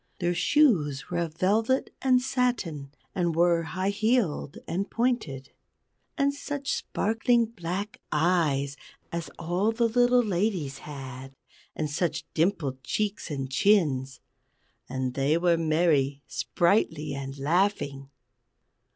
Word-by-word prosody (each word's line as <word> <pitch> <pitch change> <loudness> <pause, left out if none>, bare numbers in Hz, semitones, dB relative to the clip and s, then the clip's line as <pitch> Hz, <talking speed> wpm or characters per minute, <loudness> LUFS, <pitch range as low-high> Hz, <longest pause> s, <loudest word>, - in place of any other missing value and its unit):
Their 175 -1 0
shoes 170 - +2
were 175 - 0
of 165 -2 -3
velvet 220 +8 +1
and 255 -1 +4
satin, 230 - -1 0.2
and 175 -3 0
were 170 0 +4
high 185 +4 -2
heeled 215 - 0
and 195 +4 -2
pointed. 225 - -1 0.7
And 280 -1 +2
such 285 -1 -3
sparkling 230 +2 +1
black 200 -1 -5
eyes 150 -4 +1 0.3
as 170 0 -4
all 180 +6 0
the 230 +1 +2
little 245 +1 +4
ladies 180 - -1
had, 135 -2 -8 0.4
and 155 - -1
such 155 +4 -2
dimpled 160 -6 0
cheeks 205 +7 -2
and 135 -3 -4
chins! 140 -7 +2 0.7
And 130 -1 -2
they 140 +4 +2
were 170 0 +3
merry, 155 -4 +1
sprightly, 165 -5 +1
and 135 0 -6
laughing. 145 -3 0
170 Hz, 115 wpm, -27 LUFS, 145-215 Hz, 0.7 s, and